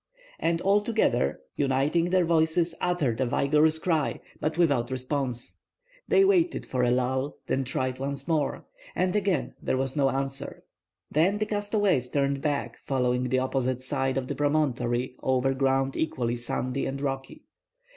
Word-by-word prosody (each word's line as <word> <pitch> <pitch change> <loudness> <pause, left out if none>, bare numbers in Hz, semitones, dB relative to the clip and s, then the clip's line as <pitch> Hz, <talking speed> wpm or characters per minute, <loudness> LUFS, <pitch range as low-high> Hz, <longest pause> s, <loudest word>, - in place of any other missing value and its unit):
And 165 0 0
all 200 +2 +3
together, 210 - +1
uniting 140 +4 +1
their 185 -1 +3
voices, 165 +1 +2
uttered 150 -10 0
a - - +3
vigorous 150 +5 +3
cry, 160 -3 0 0.2
but 155 +1 -2
without 140 -9 +2
response. 130 -1 -1 0.5
They 390 - +5
waited 360 -3 +2
for 130 - -1
a 125 - +3
lull, 130 +3 0
and 135 -1 0
tried 130 0 -1
once 140 +1 -4
more. 155 -5 0 0.3
And 185 +1 +1
again 195 -8 0
there - - 0
was 135 0 -2
no 140 -2 +3
answer. 135 +1 -3 0.5
Then 175 +7 +3
the 215 - 0
castaways 205 - 0
turned 140 0 0
back, 145 -1 -2
following 125 -2 0
the 130 +1 +1
opposite 130 -1 -1
side 135 -1 -1
of 130 -1 -2
the - - -2
promontory 130 -5 0
over 130 0 +1
ground 135 0 +1
equally 120 -6 -1
sandy 125 +2 -2
and 135 +1 -4
rocky. 135 -1 -4
135 Hz, 155 wpm, -27 LUFS, 130-160 Hz, 0.5 s, They